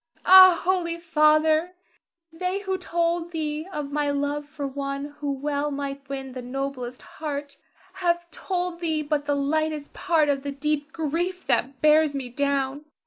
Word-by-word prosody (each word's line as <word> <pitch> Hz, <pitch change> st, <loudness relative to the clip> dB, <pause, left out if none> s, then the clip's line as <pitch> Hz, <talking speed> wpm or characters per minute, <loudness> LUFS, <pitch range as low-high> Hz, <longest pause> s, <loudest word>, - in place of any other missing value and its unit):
Ah, 370 Hz, -1 st, +9 dB
holy 350 Hz, -2 st, 0 dB
father, 315 Hz, +1 st, +3 dB, 0.6 s
they 365 Hz, +4 st, -2 dB
who 385 Hz, -1 st, -2 dB
told 340 Hz, -1 st, -1 dB
thee 310 Hz, -1 st, -3 dB
of 290 Hz, -4 st, -4 dB
my 295 Hz, 0 st, 0 dB
love 285 Hz, +1 st, -1 dB
for 290 Hz, -1 st, -6 dB
one 275 Hz, +1 st, -3 dB
who 290 Hz, -1 st, -2 dB
well 285 Hz, +1 st, -1 dB
might 275 Hz, -1 st, -5 dB
win 270 Hz, -1 st, -5 dB
the 255 Hz, 0 st, -6 dB
noblest 255 Hz, -1 st, -5 dB
heart, 285 Hz, -2 st, -6 dB, 0.4 s
have 345 Hz, -2 st, -1 dB
told 360 Hz, -2 st, -3 dB
thee 320 Hz, -3 st, -1 dB
but 295 Hz, -1 st, -1 dB
the 290 Hz, -1 st, +1 dB
lightest 300 Hz, +1 st, -1 dB
part 325 Hz, -4 st, +2 dB
of 280 Hz, -1 st, +1 dB
the 280 Hz, 0 st, -4 dB
deep 295 Hz, +1 st, -2 dB
grief 340 Hz, +4 st, -2 dB
that 265 Hz, 0 st, 0 dB
bears 305 Hz, -1 st, +5 dB
me 265 Hz, -3 st, -4 dB
down. 280 Hz, +2 st, -1 dB
300 Hz, 155 wpm, -25 LUFS, 280-335 Hz, 0.6 s, Ah